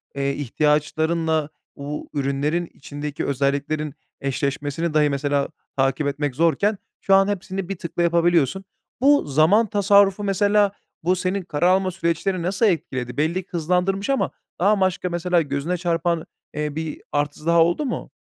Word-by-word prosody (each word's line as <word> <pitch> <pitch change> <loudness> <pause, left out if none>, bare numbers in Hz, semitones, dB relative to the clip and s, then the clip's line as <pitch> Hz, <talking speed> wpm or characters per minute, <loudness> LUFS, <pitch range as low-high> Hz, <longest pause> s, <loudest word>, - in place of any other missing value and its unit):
eee, 140 0 0
ihtiyaçlarınla 155 +3 0 0.3
u 145 +1 -6
ürünlerin 145 +4 0
içindeki 145 +1 -6
özelliklerin 140 +2 -1 0.3
eşleşmesini 145 +4 -2
dahi 150 -1 +4
mesela 140 0 0 0.3
takip 135 +2 +1
etmek 145 -1 -2
zorken 170 +7 +2 0.2
şu 195 - +4
an 195 0 +5
hepsini 195 -2 -3
bir 195 - -2
tıkla 170 +1 -3
yapabiliyorsun. 170 0 +2 0.4
Bu 285 +2 +5
zaman 160 +11 +4
tasarrufu, 200 0 +4
mesela, 205 +1 +3 0.3
bu 180 +3 +2
senin 185 +2 -1
karar 170 0 0
alma 185 0 +3
süreçlerini 175 +1 -1
nasıl 190 +6 +1
etkiledi? 130 - -1
Belli 165 +5 0
ki - - -38
hızlandırmış 180 - 0
ama 275 - +1 0.3
daha 205 +4 +4
başka 185 -2 0
mesela 175 0 +1
gözüne 150 +4 -2
çarpan, 170 -1 0 0.3
eee, 150 -1 -3
bir 160 -1 -4
artısı 145 +1 -2
daha 170 0 +5
oldu 175 - 0
mu? 255 - -4
165 Hz, 145 wpm, -22 LUFS, 145-185 Hz, 0.4 s, an